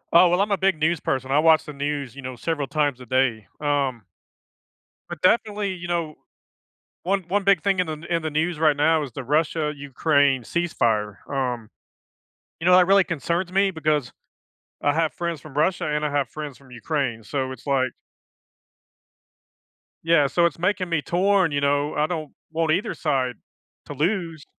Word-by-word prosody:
Oh, 175 +1 +8
well, 180 +3 +2
I'm 205 0 0
a 200 - +2
big 190 -4 +2
news 160 +1 +1
person. 130 0 -2
I 145 - +4
watch 160 0 +5
the 150 - -8
news, 140 -3 -3
you 140 - -8
know, 130 0 -6
several 145 +2 -2
times 145 -4 0
a - - -9
day. 120 -5 +1
Um, 140 -6 -1 1.1
but, - - -7
definitely, 205 0 +2
you 175 -1 -7
know, 170 -3 -2 0.9
one 195 +2 +1
one 200 +3 0
big 195 -4 +4
thing 195 -2 +1
in 180 - +1
the 155 0 -5
in 165 - +1
the 155 - -2
news 160 +1 -1
right 155 -3 +3
now 155 +1 +3
is 135 - -7
the 130 +3 -6
Russia-Ukraine 145 -2 +1
ceasefire. 110 - 0
Um, 125 -5 -2 0.9
you - - -3
know, 180 0 +7
that 180 0 +5
really 195 0 +6
concerns 170 +3 -2
me 195 +1 +2
because 150 -6 -1 0.7
I 145 - +3
have 160 0 0
friends 170 -2 -3
from 150 0 -13
Russia, 165 +4 +1
and 150 0 -1
I - - 0
have 140 -3 0
friends 150 -1 -7
from 135 -2 -19
Ukraine. 125 -3 -2
So 130 +4 -3
it's 130 - -14
like 130 -2 +1 2.1
Yeah, 160 -4 +4
so 170 +4 +2
it's 165 0 -1
making 185 0 0
me 165 -3 +1
torn, 185 +1 +2
you 145 - 0
know? 145 +1 +1
I 150 +1 +1
don't 155 -4 -4 0.2
want 160 -1 0
either 185 - -1
side 130 -5 -1 0.5
to - - -7
lose. 165 0 -1
155 Hz, 180 wpm, -23 LUFS, 140-175 Hz, 2.1 s, Oh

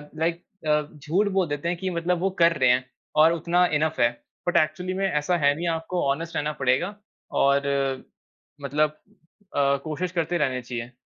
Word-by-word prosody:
Like 165 +2 -1 0.2
अ, 150 0 +4
झूठ 165 +8 0
बोल 180 -3 +3
देते 145 +3 -3
हैं 175 - -1
कि 190 +2 -3
मतलब 175 0 0
वो 195 +2 +1
कर 170 0 +5
रहे 130 -2 +4
हैं 125 +1 +3 0.4
और 165 - +6
उतना 170 +2 +2
इनफ 155 0 -1
है। 120 - +5 0.4
बट 175 - +3
एक्चुअली 175 +4 0
में 195 +1 0
ऐसा 150 +4 +1
है 145 -2 +4
नहीं, 170 +2 -3
आपको 165 +2 -2
ऑनेस्ट 165 +4 -2
रहना 150 +1 0
पड़ेगा 135 +11 +1 0.5
और 140 +1 +4 1.0
मतलब 150 +2 0 0.6
अ, 140 0 +3
कोशिश 165 +3 -3
करते 170 0 0
रहनी 130 -4 0
चाहिए। 120 0 -6
160 Hz, 180 wpm, -25 LUFS, 140-175 Hz, 1.0 s, और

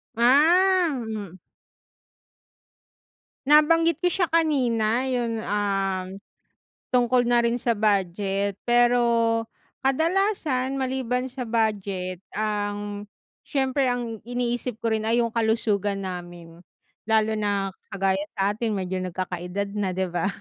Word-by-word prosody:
Ah, 335 +9 +5 0.2
hmm. 200 -5 -6 2.1
Nabanggit 330 +3 +4
ko 355 - +3
siya 355 -1 +1
kanina 255 -7 +1
yung, 235 -3 -1
um, 195 -3 -1 0.8
Tungkol 245 0 +3
na 240 0 +2
rin 235 0 +2
sa 240 0 -1
budget, 200 -1 0
pero 240 0 +4 0.8
kadalasan 305 -2 0
maliban 260 -1 -2
sa 250 -2 -6
budget 200 -5 -1 0.2
ang 205 -1 -3 0.4
siyempre 270 -1 0
ang 240 -3 -2
iniisip 245 0 -2
ko 230 - 0
rin 220 0 -1
ay 235 +1 +2
yung 230 - -1
kalusugan 210 -3 0
namin. 175 -2 -8 0.5
Lalo 220 -1 +2
na 200 -2 0 0.2
kagaya 195 0 +1 0.2
sa 195 +1 +1
atin 220 +1 -2
medyo 185 -1 -2
nagkakaedad 185 +2 -4
na 190 -3 -1
'di 185 -1 -2
ba 175 0 -1
220 Hz, 110 wpm, -25 LUFS, 195-255 Hz, 2.1 s, Ah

